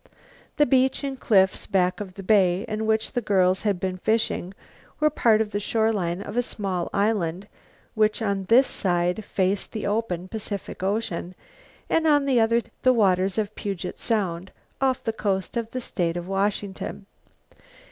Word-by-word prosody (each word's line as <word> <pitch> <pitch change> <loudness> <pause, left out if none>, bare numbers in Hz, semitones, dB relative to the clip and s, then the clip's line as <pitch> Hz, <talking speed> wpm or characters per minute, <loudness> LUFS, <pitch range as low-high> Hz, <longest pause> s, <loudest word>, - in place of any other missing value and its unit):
The 295 - +5
beach 265 +1 +2
and 270 -2 -4
cliffs 190 -4 +2
back 180 -2 +1
of 190 -3 -7
the 195 - -8
bay 190 -1 +3
in 220 0 -3
which 220 0 +1
the 245 - -1
girls 185 -3 +2
had 205 -4 0
been 185 0 -2
fishing 205 -2 -1 0.4
were 305 0 +3
part 220 -6 +3
of 215 -1 -2
the 205 - -1
shore 220 +2 +1
line 180 -1 -2
of - - -7
a 245 - +3
small 190 -7 -3
island 200 -3 0 0.5
which 215 -1 +2
on 200 -3 -1
this 245 +7 +6
side 180 0 0
faced 195 0 -1
the 215 - -4
open 200 -4 -1
Pacific 205 -2 -6
Ocean 190 -3 -2 0.5
and 325 0 +2
on 290 -2 +4
the 260 -3 +3
other 230 +1 +3 0.2
the 255 - +5
waters 190 -4 +2
of 215 -1 -1
Puget 195 -4 -5
Sound, 190 -5 -2 0.3
off 260 -1 +1
the 225 - -1
coast 195 -2 -2
of 230 -1 -2
the 255 - -4
state 175 -8 -2
of 175 0 -5
Washington. 195 0 -2
205 Hz, 170 wpm, -25 LUFS, 185-225 Hz, 0.5 s, this